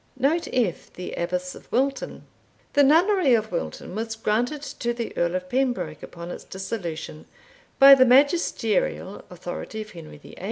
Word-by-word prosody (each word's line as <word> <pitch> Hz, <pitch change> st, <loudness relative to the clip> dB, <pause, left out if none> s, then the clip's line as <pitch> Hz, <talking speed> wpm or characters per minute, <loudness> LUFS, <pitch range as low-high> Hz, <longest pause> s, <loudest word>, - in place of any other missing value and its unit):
Note 290 Hz, +6 st, +1 dB
F. 230 Hz, -9 st, -1 dB
The 180 Hz, -, -7 dB
Abbess 180 Hz, +1 st, -3 dB
of -, -, -15 dB
Wilton. 270 Hz, +2 st, -1 dB, 0.5 s
The 285 Hz, -, +5 dB
nunnery 325 Hz, -, +5 dB
of 220 Hz, -1 st, -2 dB
Wilton 175 Hz, +1 st, -4 dB
was 225 Hz, +2 st, -3 dB
granted 240 Hz, +7 st, -1 dB
to 240 Hz, -4 st, -3 dB
the 235 Hz, -1 st, -5 dB
Earl 170 Hz, +1 st, 0 dB
of 185 Hz, 0 st, -3 dB
Pembroke 255 Hz, +3 st, -1 dB
upon 170 Hz, 0 st, -8 dB
its -, -, -8 dB
dissolution, 185 Hz, -6 st, -6 dB, 0.5 s
by 275 Hz, 0 st, +10 dB
the 265 Hz, -1 st, +7 dB
magisterial 255 Hz, -, +2 dB
authority 180 Hz, +4 st, -7 dB
of 210 Hz, 0 st, -9 dB
Henry 160 Hz, -3 st, -11 dB
VIII. 145 Hz, -, -14 dB
225 Hz, 155 wpm, -24 LUFS, 180-270 Hz, 0.5 s, by